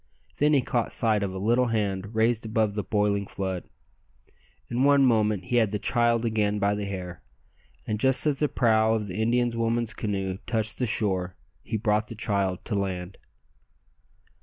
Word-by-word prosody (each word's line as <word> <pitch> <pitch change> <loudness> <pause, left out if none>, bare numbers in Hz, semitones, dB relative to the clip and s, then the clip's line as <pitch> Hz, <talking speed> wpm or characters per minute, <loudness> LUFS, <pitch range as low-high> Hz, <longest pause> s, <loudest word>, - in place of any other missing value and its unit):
Then 150 +1 +3
he 135 -3 +3
caught 120 -1 -1
sight 110 -3 +2
of 100 -2 -2
a 95 - -6
little 120 +6 +2
hand 105 -2 -2
raised 115 +1 +2
above 110 -2 0
the 105 0 -2
boiling 105 -1 0
flood. 95 -2 -4 1.1
In 120 +2 +1
one 140 -1 +5
moment 110 -5 +2
he 120 - 0
had 110 -3 +3
the 105 - -2
child 120 +1 +1
again 105 -2 +1
by 100 0 +1
the 105 0 -3
hair, 90 -5 -6 0.6
and 105 -1 -2
just 130 +4 +3
as 145 -3 +1
the 150 - +1
prow 110 -2 +3
of 110 -2 -2
the 100 +2 -4
Indian 120 +2 +2
woman's 115 0 0
canoe 95 -4 -3
touched 110 -2 -1
the 125 - 0
shore 95 -5 -1 0.3
he 110 - -3
brought 105 -1 +1
the 115 - -8
child 100 -4 -1
to 115 - -3
land. 95 -2 -3
110 Hz, 180 wpm, -26 LUFS, 100-115 Hz, 1.1 s, one